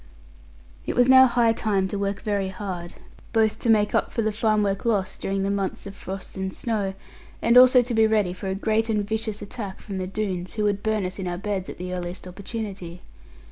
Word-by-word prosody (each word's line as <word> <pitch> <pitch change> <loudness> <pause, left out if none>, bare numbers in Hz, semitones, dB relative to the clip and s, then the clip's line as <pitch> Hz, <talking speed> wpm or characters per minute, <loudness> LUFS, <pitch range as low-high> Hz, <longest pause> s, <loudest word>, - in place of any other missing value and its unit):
It - - -1
was 245 0 +5
now 260 0 +8
high 235 -2 +3
time 200 -4 0
to 200 - -3
work 200 0 -2
very 200 -2 0
hard; 185 -3 -6 0.4
both 220 -1 +2
to 235 - -1
make 210 -2 +4
up - - +1
for 230 - -1
the 215 - +1
farm 215 0 +1
work 195 -1 -1
lost 200 -5 0
during 195 0 -1
the 195 - 0
months 195 -1 -2
of 200 - -7
frost 190 -1 -8
and 190 0 -3
snow, 205 -4 -2 0.4
and 235 +1 +3
also 250 0 +8
to 245 0 -4
be 220 -1 +5
ready 210 -5 +1
for 190 +2 -7
a 190 - -1
great 220 +2 0
and 210 -2 0
vicious 220 -1 -3
attack 200 -2 -6
from 195 -2 -6
the 185 - -3
Doones, 185 -3 -3
who 215 - -1
would 205 -1 +1
burn 215 -2 0
us 185 +2 -5
in 185 - -3
our 175 0 -2
beds 195 -1 -3
at - - -8
the 180 +1 -5
earliest 180 0 -5
opportunity. 190 -2 -6
205 Hz, 220 wpm, -24 LUFS, 190-220 Hz, 0.4 s, now